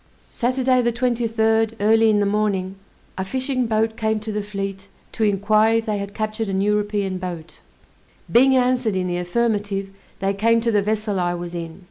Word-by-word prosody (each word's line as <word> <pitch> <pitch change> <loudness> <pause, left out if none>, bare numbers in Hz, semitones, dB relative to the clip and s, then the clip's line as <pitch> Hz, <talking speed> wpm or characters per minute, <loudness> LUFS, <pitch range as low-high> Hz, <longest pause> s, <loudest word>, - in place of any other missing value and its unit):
Saturday, 255 +1 +1
the 235 0 +1
23d, 225 -2 +1
early 220 +2 +4
in 210 -1 +3
the 205 - +2
morning, 200 -2 0 0.4
a - - 0
fishing 255 +4 -1
boat 220 0 0
came 220 -1 0
to 215 +1 -6
the 210 0 -2
fleet 195 -1 -5 0.2
to 225 - -2
inquire 215 +2 +3
if 225 0 0
they 210 -2 -1
had 200 0 -6
captured 215 0 -3
an 190 0 -1
European 205 -2 0
boat; 175 -3 -7 0.7
being 265 +3 +5
answered 250 -4 +1
in 185 -1 0
the 175 -1 -2
affirmative, 200 0 -1 0.3
they 195 0 0
came 230 +3 +3
to 230 0 0
the 205 -2 +3
vessel 210 -1 -1
I 175 0 0
was 175 0 -6
in. 165 -1 -6
215 Hz, 180 wpm, -22 LUFS, 195-225 Hz, 0.7 s, being